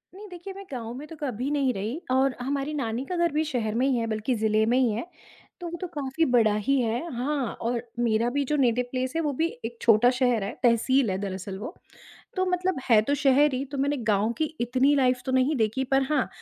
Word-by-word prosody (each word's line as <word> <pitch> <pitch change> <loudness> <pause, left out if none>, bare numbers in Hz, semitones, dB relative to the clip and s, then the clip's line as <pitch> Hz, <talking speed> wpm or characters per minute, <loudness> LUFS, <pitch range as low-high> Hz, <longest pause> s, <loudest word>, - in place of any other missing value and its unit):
नहीं, 415 +2 -10
देखिए, 360 +2 -8
मैं 395 +1 -10
गाँव 235 -3 -5
में 300 +2 -8
तो 325 - -10
कभी 265 -3 -3
नहीं 275 -4 +1
रही 220 - -4
और 265 0 +2
हमारी 275 +3 -2
नानी 240 -3 -2
का 360 - -4
घर 345 -1 +2
भी 305 +2 +1
शहर 230 -7 -2
में 250 +3 +2
ही 260 -3 +2
है, 230 - -1
बल्कि 220 +3 -1
जिले 220 0 +2
में 240 +3 +2
ही 255 -2 +3
है, 220 +9 -3 0.6
तो 345 - -4
वो 345 - -6
तो 365 - -3
काफ़ी 290 +2 -1
बड़ा 235 -5 +3
ही 270 +6 +1
है। 230 0 -1
हाँ, 265 +1 -1
और 235 0 -1 0.2
मेरा 230 0 +2
भी 285 - +2
जो - - +3
नेटिव 250 -2 +2
प्लेस 255 0 -2
है, 330 - +1
वो 295 -3 -1
भी 320 +5 +1 0.2
एक 235 +1 -6
छोटा 230 +1 +5
शहर 245 -5 +2
है, 200 - -3
तहसील 240 +1 +3
है 185 - -1
दरअसल 190 -1 -5
वो। 280 - -6 0.6
तो 370 - +2
मतलब 360 -2 0
है 225 -3 +7
तो 285 +6 0
शहर 285 +1 +4
ही, 260 +2 -2
तो 280 0 -7
मैंने 285 +2 +1
गाँव 210 +3 +2
की 315 - +2 0.2
इतनी 255 +4 +3
लाइफ़ 250 -2 +2
तो 260 - -1
नहीं 260 +4 +2
देखी, 225 +3 0
पर 270 +1 +2
हाँ, 290 -4 +1
255 Hz, 240 wpm, -26 LUFS, 230-285 Hz, 0.6 s, है